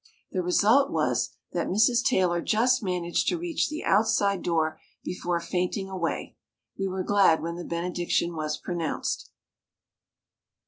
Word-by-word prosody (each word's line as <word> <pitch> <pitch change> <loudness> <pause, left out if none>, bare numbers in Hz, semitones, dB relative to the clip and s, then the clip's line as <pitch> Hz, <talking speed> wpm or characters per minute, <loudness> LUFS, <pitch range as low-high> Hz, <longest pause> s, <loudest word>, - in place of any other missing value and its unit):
The 185 - -1
result 220 +10 +4
was - - +1 0.2
that - - -1
Mrs. 225 +5 +3
Taylor 180 -9 +2
just 250 +6 +2
managed 180 -3 -1
to 350 - +1
reach 340 -1 -1
the 305 +1 -5
outside 200 -2 +2
door 160 -2 0 0.2
before 175 -1 -2
fainting 180 +3 -2
away. 180 -3 -3 0.4
We 195 - -2
were 185 0 -3
glad 195 -6 +4
when 170 +1 -3
the 175 - -6
benediction 175 0 -1
was 155 -1 -2
pronounced. 175 -3 -3
180 Hz, 135 wpm, -27 LUFS, 170-210 Hz, 0.4 s, result